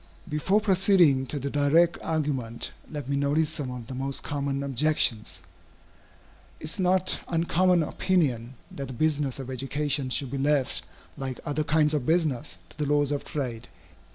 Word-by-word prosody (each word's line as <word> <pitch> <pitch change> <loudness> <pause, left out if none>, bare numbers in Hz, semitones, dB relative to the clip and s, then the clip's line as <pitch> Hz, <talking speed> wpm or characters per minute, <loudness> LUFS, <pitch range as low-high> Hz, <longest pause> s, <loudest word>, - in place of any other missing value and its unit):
Before 170 +6 +2
proceeding 185 -9 +4
to 145 - -3
the 140 0 -3
direct 155 +4 +3
argument, 140 -7 -2 0.2
let 145 -4 -6
me 140 - 0
notice 145 +2 +2
some 140 -4 -3
of 125 -2 -6
the 130 - -7
most 135 +1 -3
common 140 -1 -2
objections. 125 - 0 1.2
It - - -14
is 155 +6 0
a - - +1
not 185 0 +2
uncommon 175 +1 +2
opinion, 135 -10 0 0.2
that 140 -1 -6
the 130 - -7
business 145 -1 +1
of 130 -1 -6
education 135 +1 -1
should 130 0 -2
be 140 - -3
left, 140 -1 +1 0.4
like 130 -2 -4
other 150 +1 0
kinds 150 0 +3
of 145 -5 -1
business, 155 -5 0
to - - -16
the 150 - 0
laws 145 0 +2
of 145 - -1
trade. 125 -5 -4
145 Hz, 165 wpm, -27 LUFS, 135-155 Hz, 1.2 s, proceeding